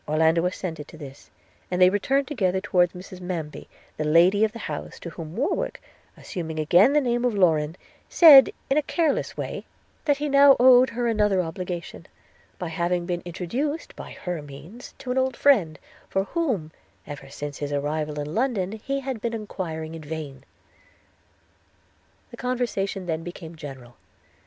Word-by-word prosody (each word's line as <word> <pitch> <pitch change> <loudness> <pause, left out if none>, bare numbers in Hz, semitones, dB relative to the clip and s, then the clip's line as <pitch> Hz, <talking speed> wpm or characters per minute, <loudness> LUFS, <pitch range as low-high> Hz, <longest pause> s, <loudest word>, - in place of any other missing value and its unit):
Orlando 160 +2 +3
assented 165 -5 -5
to 160 - -13
this, 140 -3 -11 0.4
and 180 - -2
they 180 0 +7
returned 265 +7 +1
together 190 -10 0
towards 180 -3 +2
Mrs 185 0 -10
Manby, 170 -4 -5 0.3
the 155 - -1
lady 175 +7 +4
of 220 - +2
the 230 - -9
house, - - -6
to 170 - -7
whom 160 +1 -8
Warwick, 265 - -1 0.4
assuming 160 -3 -6
again 175 - +5
the 300 - +5
name 240 -2 0
of 245 -3 +1
Lorrain, 160 -5 +2 0.3
said, 295 -6 +9 0.2
in 270 - +1
a - - +4
careless 315 0 -1
way, - - -5 0.4
'that 290 -2 +3
he 295 +1 -2
now 280 -1 +7
owed 255 0 +7
her 240 +1 -2
another 210 -4 +2
obligation, 170 - -6 0.5
by 175 - -4
having 175 +2 -1
been 175 -1 -2
introduced, 245 - -4
by - - -9
her 180 -4 -3
means, 150 - -12
to 250 - -6
an 260 - +1
old 260 -1 -1
friend, 195 - +3 0.3
for 195 - 0
whom, 215 - -2 0.3
ever 145 -2 -9
since 145 0 -7
his 145 -1 -4
arrival 150 +1 -2
in 145 +1 -5
London, 225 -6 0
he 275 +6 -4
had 260 -4 -5
been 230 0 -2
enquiring 165 -7 -5
in 165 - -8
vain.' 150 -3 -7 1.9
The - - -10
conversation 235 -7 -2
then 165 -2 -2
became 170 -1 -9
general. 135 -6 -10
180 Hz, 165 wpm, -25 LUFS, 160-245 Hz, 1.9 s, said